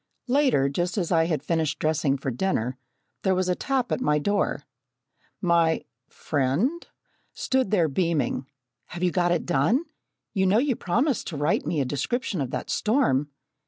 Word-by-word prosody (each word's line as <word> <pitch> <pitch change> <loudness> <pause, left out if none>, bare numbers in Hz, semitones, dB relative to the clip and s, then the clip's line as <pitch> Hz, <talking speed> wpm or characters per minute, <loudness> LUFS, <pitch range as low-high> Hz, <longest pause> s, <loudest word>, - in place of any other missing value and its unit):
Later, 255 - +3
just 175 +8 -2
as 180 -3 -1
I 165 -2 +4
had 155 -4 -1
finished 160 -1 0
dressing 155 -3 +1
for 135 0 -3
dinner, 125 -4 -1 0.5
there 190 -1 +2
was 185 0 0
a - - +3
tap 260 +4 -1
at - - 0
my 150 -10 +2
door. 205 +7 0 0.8
My 170 -3 +2 0.2
friend 155 - -1 0.2
(?) - - -42
stood 260 -4 0
there 180 -6 +3
beaming. 155 -4 0 0.4
"Have 175 +1 -6
you 180 - +3
got 175 -1 +1
it 175 - 0
done? 215 - +2 0.5
You 190 -3 +2
know 195 +3 +4
you 260 +1 +2
promised 240 - 0
to 160 - -5
write 145 +3 0
me 155 -4 0
a - - 0
description 180 - -2
of 130 - -2
that - - -4
storm!" 210 - +1
175 Hz, 170 wpm, -25 LUFS, 150-215 Hz, 0.8 s, I